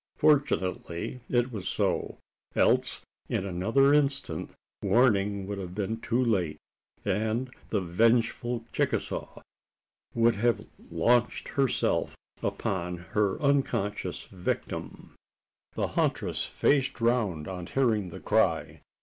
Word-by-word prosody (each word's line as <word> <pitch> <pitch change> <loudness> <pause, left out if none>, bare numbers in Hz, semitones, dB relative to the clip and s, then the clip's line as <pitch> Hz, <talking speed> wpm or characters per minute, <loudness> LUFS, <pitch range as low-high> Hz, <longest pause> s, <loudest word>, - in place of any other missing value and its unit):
Fortunately 110 - +1
it 120 +1 +2
was 100 -6 -5
so: - - -1 0.4
else - - +2 0.3
in 95 - -1
another 115 +10 +3
instant 140 -2 0 0.3
warning 100 -5 +3
would 100 0 -4
have 90 -1 -6
been 105 +2 -2
too 125 +2 +1
late, 90 -9 +1 0.5
and 110 +5 0 0.2
the 105 - +1
vengeful 115 +5 +1
Chicasaw - - -2 0.7
would 115 -1 +4
have 120 +2 +1 0.2
launched 120 0 +2
herself 135 -3 0 0.2
upon 90 -2 -2 0.2
her 105 -2 +2
unconscious 135 -8 0
victim. 90 -2 -5 0.6
The - - 0
huntress - - 0
faced 135 -3 +1
round 115 -10 +1
on 90 -2 -5
hearing 110 -8 +1
the 85 - -8
cry. - - +1
110 Hz, 105 wpm, -28 LUFS, 95-125 Hz, 0.7 s, would